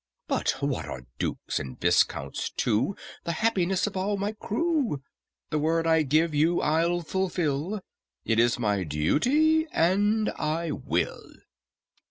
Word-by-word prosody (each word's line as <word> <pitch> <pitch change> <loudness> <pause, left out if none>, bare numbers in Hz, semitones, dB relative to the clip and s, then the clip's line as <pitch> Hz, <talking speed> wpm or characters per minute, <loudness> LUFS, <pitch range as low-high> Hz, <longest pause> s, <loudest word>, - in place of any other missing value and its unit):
"But - - 0
what - - -1
are 65 -1 -7
dukes - - -2
and 65 -1 -7
viscounts - - +1
to 125 - 0 0.3
The 170 - -2
happiness 190 -2 +1
of 210 - -4
all 200 +2 0
my 200 +2 -1
crew? 235 - -1 0.5
The 150 - +1
word 165 +2 +1
I 160 -1 +4
gave 155 +3 +2
you 160 +4 +3
I'll 170 +3 +1
fulfil; 180 0 -1 0.4
It 115 0 +2
is 120 0 +3
my 105 -5 0
duty, 265 - +2
and 205 +6 +2
I 160 +1 -1
will. - - -2
165 Hz, 135 wpm, -27 LUFS, 145-205 Hz, 0.5 s, I